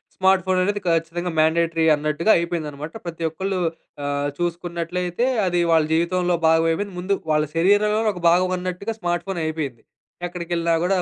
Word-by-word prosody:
Smart 190 Hz, -1 st, +3 dB
phone 185 Hz, 0 st, +1 dB
అనేది 205 Hz, +2 st, -1 dB
ఖచ్చితంగా 165 Hz, +2 st, 0 dB
mandatory 165 Hz, +1 st, +2 dB
అన్నట్టుగా 150 Hz, +6 st, +1 dB
అయిపోయిందనమాట. 155 Hz, -3 st, -4 dB
ప్రతి 165 Hz, -1 st, -5 dB
ఒక్కళ్ళు 190 Hz, +4 st, -3 dB, 0.5 s
ఆహ్, 145 Hz, 0 st, -1 dB
చూసుకున్నట్లయితే 175 Hz, +4 st, -2 dB, 0.2 s
అది 175 Hz, -1 st, +1 dB
వాళ్ళ 160 Hz, -1 st, +4 dB
జీవితంలో 175 Hz, +2 st, +1 dB
భాగమైపోయింది. 165 Hz, +4 st, +2 dB
ముందు 185 Hz, +3 st, 0 dB, 0.2 s
వాళ్ళ 150 Hz, 0 st, +3 dB
శరీరంలోనే 210 Hz, +5 st, +3 dB
ఒక 180 Hz, -, -9 dB
భాగమన్నట్టుగా 185 Hz, +4 st, 0 dB
స్మార్ట్ 175 Hz, -2 st, -1 dB
ఫోన్ 190 Hz, -3 st, -3 dB
అయిపోయింది. 150 Hz, -7 st, -4 dB, 0.4 s
ఎక్కడికెళ్ళినా 170 Hz, -1 st, -1 dB
గూడా 190 Hz, +2 st, +2 dB
175 Hz, 135 wpm, -22 LUFS, 165-185 Hz, 0.5 s, వాళ్ళ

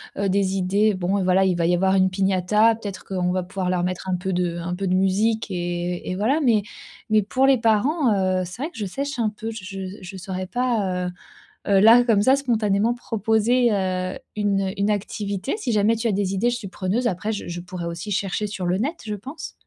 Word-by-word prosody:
heu -, -, -4 dB
heu, 195 Hz, -, +1 dB
des 195 Hz, 0 st, +1 dB
idées, 200 Hz, +3 st, +2 dB
bon, 190 Hz, +2 st, 0 dB
voilà, 185 Hz, +1 st, +3 dB
il 185 Hz, -2 st, +1 dB
va 170 Hz, -, +1 dB
y 175 Hz, +1 st, +3 dB
avoir 190 Hz, +2 st, +2 dB
une 190 Hz, 0 st, +4 dB
piñata, 195 Hz, +4 st, +2 dB
peut-être 205 Hz, -4 st, -7 dB
qu'on 180 Hz, -2 st, -1 dB
va 185 Hz, -1 st, -1 dB
pouvoir 185 Hz, 0 st, -3 dB
leur 180 Hz, -1 st, 0 dB
mettre 185 Hz, +1 st, -3 dB
un 185 Hz, -, +1 dB
peu 185 Hz, +2 st, -3 dB
de 175 Hz, -1 st, -1 dB
un 175 Hz, +1 st, -4 dB
peu 195 Hz, +2 st, -3 dB
de 185 Hz, -, +2 dB
musique 205 Hz, +4 st, +1 dB
et 175 Hz, 0 st, -3 dB
et 185 Hz, -, -2 dB
voilà 235 Hz, +10 st, +1 dB
mais 225 Hz, -6 st, +3 dB, 0.5 s
mais 215 Hz, -1 st, +4 dB
pour 260 Hz, +6 st, +1 dB
les 270 Hz, -1 st, +5 dB
parents, 230 Hz, +4 st, +2 dB, 0.3 s
heu, -, -, -1 dB
c'est 185 Hz, +8 st, -9 dB
vrai 310 Hz, +4 st, -3 dB
que -, -, -15 dB
je 210 Hz, -, -2 dB
sèche 280 Hz, +6 st, -4 dB
un 225 Hz, -, +2 dB
peu. 220 Hz, +2 st, -6 dB
Je 210 Hz, -4 st, -8 dB
je 195 Hz, 0 st, -7 dB, 0.2 s
je 185 Hz, +1 st, -9 dB
saurais 185 Hz, 0 st, -5 dB
pas, 205 Hz, -7 st, -1 dB
heu 180 Hz, -, -4 dB, 0.6 s
heu, 195 Hz, -1 st, +5 dB
là, 230 Hz, +4 st, +7 dB
comme 220 Hz, -4 st, +3 dB
ça, 260 Hz, +6 st, +5 dB
spontanément, 225 Hz, -4 st, +1 dB
proposer, 225 Hz, +1 st, +1 dB
heu, 185 Hz, -2 st, -1 dB, 0.2 s
une, 205 Hz, -2 st, +1 dB
heu, 190 Hz, -1 st, -1 dB
une 200 Hz, +1 st, +1 dB
activité. 205 Hz, -, -2 dB
Si 245 Hz, -, -2 dB
jamais 215 Hz, +2 st, +3 dB
tu 230 Hz, +1 st, -3 dB
as 225 Hz, -, +2 dB
des 195 Hz, -1 st, -1 dB
idées, 230 Hz, +6 st, +2 dB
je 240 Hz, -, -2 dB
suis 210 Hz, -5 st, -7 dB
preneuse 200 Hz, +6 st, -2 dB
après 210 Hz, +2 st, -1 dB
je 205 Hz, -, -5 dB
je 175 Hz, 0 st, -5 dB
pourrais 180 Hz, -1 st, -6 dB
aussi 170 Hz, +5 st, -5 dB
chercher 200 Hz, +1 st, -1 dB
sur 195 Hz, -3 st, -4 dB
le 180 Hz, +1 st, +1 dB
net, 275 Hz, -, -1 dB
je 210 Hz, -, -3 dB
pense. 270 Hz, -, -8 dB
200 Hz, 240 wpm, -23 LUFS, 185-225 Hz, 0.6 s, là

